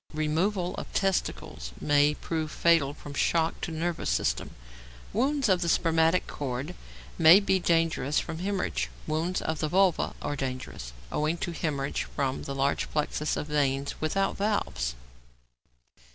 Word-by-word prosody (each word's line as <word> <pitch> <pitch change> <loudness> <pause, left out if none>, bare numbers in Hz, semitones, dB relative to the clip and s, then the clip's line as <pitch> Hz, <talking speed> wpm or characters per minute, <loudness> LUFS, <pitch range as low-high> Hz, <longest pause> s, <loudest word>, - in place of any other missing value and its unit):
Removal 175 +5 0
of - - -6
testicles 180 - -1
may 145 0 +3
prove 160 -1 -3
fatal 150 -4 +3
from 145 -1 -9
shock 165 +3 +1
to - - -3
nervous 165 - -2
system. - - 0 0.6
Wounds 270 +4 +1
of 185 -3 +3
the 170 - 0
spermatic 165 +1 +3
cord 140 +4 -4 0.5
may 165 +5 +9
be 190 -2 +2
dangerous 165 -4 +1
from 160 - -5
hæmorrhage. 95 - -1 0.2
Wounds 165 +4 -1
to 160 - +1
the 155 -1 -2
vulva 185 +1 +2
are 145 - -3
dangerous, 130 - -5 0.2
owing 155 +3 0
to 175 - -3
hæmorrhage 145 -4 -2
from 135 -2 -1
the 140 - -4
large 135 +1 0
plexus 150 0 -1
of - - -2
veins 140 -2 0
without 195 +5 0
valves. 65 - -1
155 Hz, 140 wpm, -28 LUFS, 140-175 Hz, 0.6 s, may